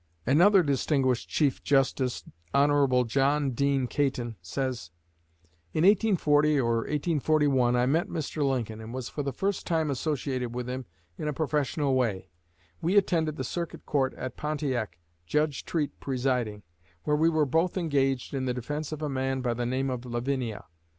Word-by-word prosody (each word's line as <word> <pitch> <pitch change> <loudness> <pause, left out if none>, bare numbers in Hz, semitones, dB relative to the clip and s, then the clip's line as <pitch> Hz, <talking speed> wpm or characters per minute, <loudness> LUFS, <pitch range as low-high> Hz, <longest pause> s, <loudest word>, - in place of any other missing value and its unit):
Another 180 - +5
distinguished 135 -3 +1
Chief 145 -4 +1
Justice, 135 -2 +1 0.3
Hon. 140 -3 +4
John 140 +3 +2
Dean 135 +1 +1
Caton; 125 -3 -1
says: 125 0 -3 0.8
"In 155 - +1
1840 155 -8 +4
or 115 -2 +2
1841, 145 -2 +1
I 125 0 +3
met 160 +9 +1
Mr. 155 -4 -4
Lincoln, 115 -5 -1
and 110 +3 -7
was 130 -2 -4
for 150 - -4
the 140 -1 -2
first 195 +9 -2
time 160 -3 +1
associated 130 -4 -2
with 125 0 -3
him 130 -1 -5 0.3
in 150 - -3
a 150 - -1
professional 145 -1 0
way. 115 -10 -1 0.5
We 180 +5 +2
attended 160 -6 +2
the 130 - -4
Circuit 170 +6 -5
Court 135 -3 0
at 130 -1 -6
Pontiac, 145 - -2 0.3
Judge 150 - 0
Treat 155 -4 -2
presiding, 125 -6 -1 0.4
where 150 - +1
we 160 +2 +4
were 155 -2 +2
both 165 +7 +1
engaged 135 -7 0
in 135 -1 -1
the 125 -1 -1
defense 145 +5 -4
of 155 0 -5
a - - 0
man 135 -1 -1
by 120 -2 0
the 120 0 -2
name 130 +2 -1
of 125 -1 -4
Lavinia. 120 -2 -3
135 Hz, 160 wpm, -28 LUFS, 125-150 Hz, 0.8 s, Another